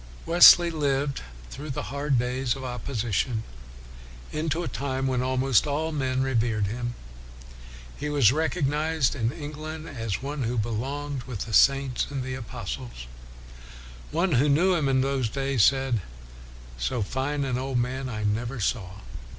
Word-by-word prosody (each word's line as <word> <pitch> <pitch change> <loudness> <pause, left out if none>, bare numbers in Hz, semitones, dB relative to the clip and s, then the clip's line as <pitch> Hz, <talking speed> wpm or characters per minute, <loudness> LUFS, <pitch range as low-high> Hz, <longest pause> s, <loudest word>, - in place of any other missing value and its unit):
Wesley 175 0 +8
lived 140 - 0 0.3
through 150 +3 -7
the 135 - -3
hard 140 -1 +1
days 125 +1 0
of 135 - -8
opposition 120 -2 -2 0.9
into 160 +2 -1
a - - -3
time 135 -1 -2
when 130 -2 +1
almost 130 +1 +2
all 155 +3 -1
men 130 -3 0
revered 115 -5 +1
him. 120 +4 -4 1.0
He 150 - -3
was 140 -7 +5
recognized 155 -1 0
in 115 -4 -1
Eng 150 0 -7
land 155 +1 -6
as 115 -7 -3
one 145 +1 -4
who 120 0 -1
belonged 130 +6 -3
with 115 -7 -6
the 115 - -5
saints 135 +1 +4
and 135 -2 -3
the 130 0 -4
apostles. - - -6 1.0
One 170 +3 0
who 140 +2 +3
knew 175 +7 +4
him 155 -6 +1
in 130 -1 +3
those 135 -3 0
days 135 -3 +1
said, 135 -4 +3 0.4
" - - -17 0.3
So 65 - -1
fine 135 +6 -2
an 125 -2 -1
old 130 -1 -2
man 130 +2 -2
I 105 -2 -4
never 115 +5 -1
saw. 100 -2 -2
130 Hz, 155 wpm, -26 LUFS, 120-145 Hz, 1.0 s, Wesley